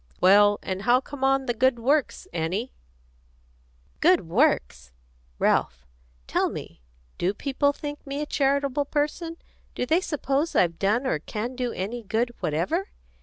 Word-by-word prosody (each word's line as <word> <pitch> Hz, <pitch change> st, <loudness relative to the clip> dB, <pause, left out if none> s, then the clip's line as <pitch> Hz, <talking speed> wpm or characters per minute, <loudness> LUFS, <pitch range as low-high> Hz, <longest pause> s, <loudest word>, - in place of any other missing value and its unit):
Well, 205 Hz, +2 st, +6 dB
and 190 Hz, 0 st, -3 dB
how 245 Hz, +4 st, +4 dB
come 270 Hz, 0 st, -8 dB
on 270 Hz, 0 st, +3 dB
the 240 Hz, -, 0 dB
good 260 Hz, +2 st, +2 dB
works, 275 Hz, +5 st, 0 dB
Annie?" 180 Hz, +9 st, -2 dB, 1.2 s
"The -, -, -37 dB
good -, -, +4 dB
works! 60 Hz, +1 st, +1 dB, 0.5 s
Ralph, 60 Hz, +1 st, +1 dB, 0.4 s
tell -, -, +1 dB
me: -, -, -8 dB, 0.4 s
do 190 Hz, +4 st, 0 dB
people 285 Hz, +3 st, +1 dB
think 290 Hz, 0 st, -7 dB
me 275 Hz, +1 st, -3 dB
a 300 Hz, -, -1 dB
charitable 280 Hz, 0 st, +1 dB
person? 305 Hz, +4 st, -2 dB, 0.4 s
Do -, -, -1 dB
they 325 Hz, +7 st, +2 dB
suppose 295 Hz, -2 st, -1 dB
I've 170 Hz, -2 st, +2 dB
done 215 Hz, +7 st, +1 dB
or 160 Hz, -, 0 dB
can 220 Hz, +9 st, -5 dB
do 250 Hz, -1 st, -2 dB
any 215 Hz, +6 st, -4 dB
good 225 Hz, +3 st, -1 dB
whatever?" 180 Hz, -, -1 dB
250 Hz, 150 wpm, -25 LUFS, 200-285 Hz, 1.2 s, Well